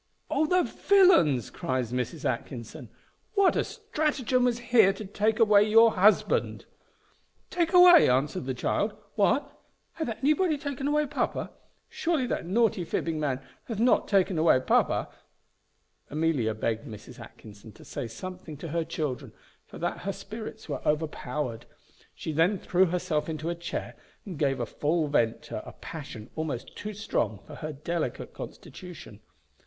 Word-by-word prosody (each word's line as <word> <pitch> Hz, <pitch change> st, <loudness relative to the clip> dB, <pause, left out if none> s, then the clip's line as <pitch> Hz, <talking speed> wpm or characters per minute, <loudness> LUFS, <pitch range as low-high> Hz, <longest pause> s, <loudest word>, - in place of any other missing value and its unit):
"O, 305 Hz, +2 st, +2 dB
the 360 Hz, +2 st, +3 dB
villains!" 355 Hz, -, +4 dB
cries 125 Hz, -2 st, -2 dB
Mrs. 125 Hz, +4 st, -3 dB
Atkinson, 125 Hz, +1 st, -4 dB, 0.5 s
"what 395 Hz, -2 st, +4 dB
a -, -, +2 dB
stratagem 305 Hz, -, -1 dB
was 240 Hz, -2 st, +1 dB
here 230 Hz, -4 st, +4 dB
to 205 Hz, +2 st, -8 dB
take 210 Hz, +2 st, 0 dB
away 210 Hz, -3 st, +6 dB
your 225 Hz, +2 st, +6 dB
husband!" 205 Hz, +2 st, +2 dB, 0.9 s
"Take 340 Hz, -2 st, 0 dB
away!" 355 Hz, -2 st, +8 dB
answered 135 Hz, +4 st, 0 dB
the 130 Hz, -, -2 dB
child 205 Hz, -, -1 dB, 0.2 s
"What! 220 Hz, +7 st, +1 dB, 0.4 s
hath 320 Hz, -6 st, -3 dB
anybody 305 Hz, +7 st, +1 dB
taken 280 Hz, -2 st, -4 dB
away 300 Hz, +1 st, +2 dB
papa? 280 Hz, -, -2 dB, 0.4 s
Sure 320 Hz, -6 st, -1 dB
that 170 Hz, -, -3 dB
naughty 210 Hz, -1 st, +2 dB
fibbing 165 Hz, -1 st, -2 dB
man 140 Hz, -3 st, -1 dB, 0.2 s
hath 225 Hz, -, -5 dB
not 245 Hz, +2 st, +3 dB
taken 190 Hz, -4 st, +2 dB
away 160 Hz, -5 st, +5 dB
papa?" 130 Hz, -, +1 dB, 1.0 s
Amelia 145 Hz, -8 st, 0 dB
begged 115 Hz, +4 st, -2 dB
Mrs. 105 Hz, -4 st, -10 dB
Atkinson 105 Hz, 0 st, -13 dB
to -, -, -16 dB
say 125 Hz, -, -5 dB
something 180 Hz, +5 st, -8 dB
to 165 Hz, +3 st, -7 dB
her 165 Hz, +2 st, 0 dB
children, 150 Hz, -5 st, -4 dB, 0.4 s
for -, -, -11 dB
that -, -, -2 dB
her 200 Hz, +1 st, -3 dB
spirits 220 Hz, +2 st, -8 dB
were 140 Hz, -4 st, -4 dB
overpowered. 150 Hz, -5 st, -2 dB, 0.5 s
She 160 Hz, -, -5 dB
then 165 Hz, +7 st, +2 dB
threw 185 Hz, 0 st, +2 dB
herself 170 Hz, -3 st, -1 dB
into 160 Hz, +1 st, -3 dB
a -, -, -1 dB
chair, 170 Hz, 0 st, -5 dB, 0.3 s
and 180 Hz, -8 st, -7 dB
gave 135 Hz, -3 st, +1 dB
a 120 Hz, -, -1 dB
full 155 Hz, +6 st, 0 dB
vent 115 Hz, -6 st, +1 dB
to -, -, -6 dB
a -, -, -10 dB
passion 135 Hz, -8 st, -9 dB
almost 155 Hz, -6 st, -4 dB
too 210 Hz, 0 st, -6 dB
strong 110 Hz, -, -1 dB
for -, -, -11 dB
her 155 Hz, -, -5 dB
delicate 155 Hz, -2 st, -4 dB
constitution. 165 Hz, -, -10 dB
170 Hz, 150 wpm, -28 LUFS, 140-230 Hz, 1.0 s, away